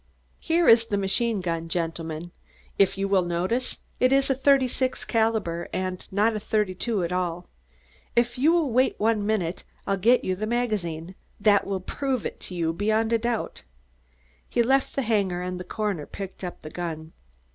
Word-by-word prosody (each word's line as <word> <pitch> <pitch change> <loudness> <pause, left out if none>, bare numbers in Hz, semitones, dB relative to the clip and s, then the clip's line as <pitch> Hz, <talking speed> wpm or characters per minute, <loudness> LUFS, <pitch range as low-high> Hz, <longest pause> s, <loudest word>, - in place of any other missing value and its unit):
"Here 335 0 +2
is 230 0 +7
the 205 -3 0
machine 200 +2 0
gun, 165 -2 -3
gentlemen. 165 0 -3 0.5
If 195 0 +4
you 195 0 0
will 195 -1 +3
notice, 180 +9 -1 0.2
it 255 +1 +4
is 275 0 +3
a - - +5
36 260 -1 +2
caliber 220 -7 0
and 185 -1 -3
not 210 +3 +2
a - - -1
32 210 0 -1
at 170 - -2
all. 180 -1 -2 0.7
If 240 0 +2
you 285 +6 +4
will 335 -6 +2
wait 255 +3 +2
one 220 -1 +2
minute, 200 -5 -1 0.2
I'll 195 - 0
get 235 +6 +4
you 185 - 0
the 215 +3 -3
magazine. 190 -8 -2 0.3
That 205 -1 +4
will 195 -1 -2
prove 265 +4 -2
it - - -4
to 180 - -7
you 165 -1 0
beyond 220 +4 +1
a 230 - +3
doubt." 235 0 -2 0.9
He 240 - +2
left 265 +3 +2
the 275 - 0
hangar 200 -6 0
and 180 0 -4
the - - -5
coroner 205 -7 -3
picked 195 -1 -8
up 180 - -6
the 155 - -8
gun. 160 -2 -5
205 Hz, 180 wpm, -26 LUFS, 180-235 Hz, 0.9 s, is